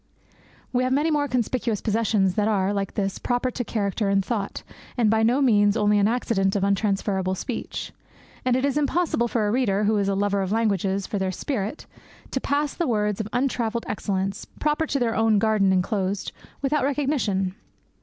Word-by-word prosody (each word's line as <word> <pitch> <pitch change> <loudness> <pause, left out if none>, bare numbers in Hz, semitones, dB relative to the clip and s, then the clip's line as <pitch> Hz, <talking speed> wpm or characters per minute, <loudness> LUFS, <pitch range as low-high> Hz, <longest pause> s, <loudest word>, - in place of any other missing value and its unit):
We 250 0 +2
have 255 0 +1
many 300 +4 +2
more 295 -1 +1
conspicuous 240 -3 -1
possessions 210 -3 +1
that 210 +2 +1
are, 200 -2 +1
like 200 -1 -3
this, 195 -2 -1
proper 245 +1 0
to 245 - -3
character 205 -2 -1
and 195 -1 +2
thought, 210 -5 -3 0.3
and 225 -3 +3
by 220 0 +3
no 245 +5 +3
means 205 -4 +4
only 210 0 +3
an 200 - +4
accident 215 -5 0
of 200 - +1
untransferable 195 -1 0
speech. - - -5 0.5
And 255 -1 +2
it 260 +2 +1
is 280 +1 +1
impossible 295 -4 +1
for 225 -2 0
a - - +1
reader, 210 -5 +1
who 210 +1 +2
is 200 -1 +1
a 195 - +1
lover 200 0 +1
of 190 0 -2
languages 200 -3 0
for 205 - -3
their 190 -1 0
spirit, 220 - -3 0.5
to 265 - -1
pass 290 +1 0
the 340 - -1
words 210 -3 0
of 215 - -5
untravelled 240 -3 -1
excellence, 195 -1 -2
proper 300 +1 +1
to 285 - 0
their 235 -3 0
own 225 -1 +3
garden 210 -2 +3
enclosed, 190 +1 0 0.3
without 285 0 +1
recognition. 265 -10 0
215 Hz, 185 wpm, -24 LUFS, 195-250 Hz, 0.5 s, means